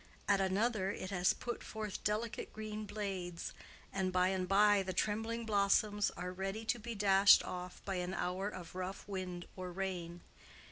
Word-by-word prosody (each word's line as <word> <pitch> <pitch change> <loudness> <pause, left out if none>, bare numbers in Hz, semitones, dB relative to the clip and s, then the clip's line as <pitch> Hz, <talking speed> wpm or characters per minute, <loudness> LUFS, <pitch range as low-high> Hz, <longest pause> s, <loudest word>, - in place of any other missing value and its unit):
at 200 -1 +4
another, 195 +1 +1
it 190 -1 -4
has 180 -2 +3
put 240 - -4
forth 215 -3 -5
delicate 215 +2 -1
green 215 0 -5
blades, 195 -5 -4 0.4
and 190 -1 0
by 180 0 +3
and 185 -1 -1
by 205 +1 +5
the 190 -1 -3
trembling 225 +4 -1
blossoms 205 0 +3
are 180 +1 -4
ready 195 +4 -3
to 240 +2 +1
be 230 +1 -5
dashed 195 -1 +7
off 180 0 -6
by 195 -2 -1
an 180 +1 -2
hour 180 +3 -1
of 180 -5 -8
rough 185 +1 -5
wind 185 -3 -4
or 185 -1 -5
rain. 175 -2 -4
195 Hz, 170 wpm, -35 LUFS, 185-210 Hz, 0.4 s, dashed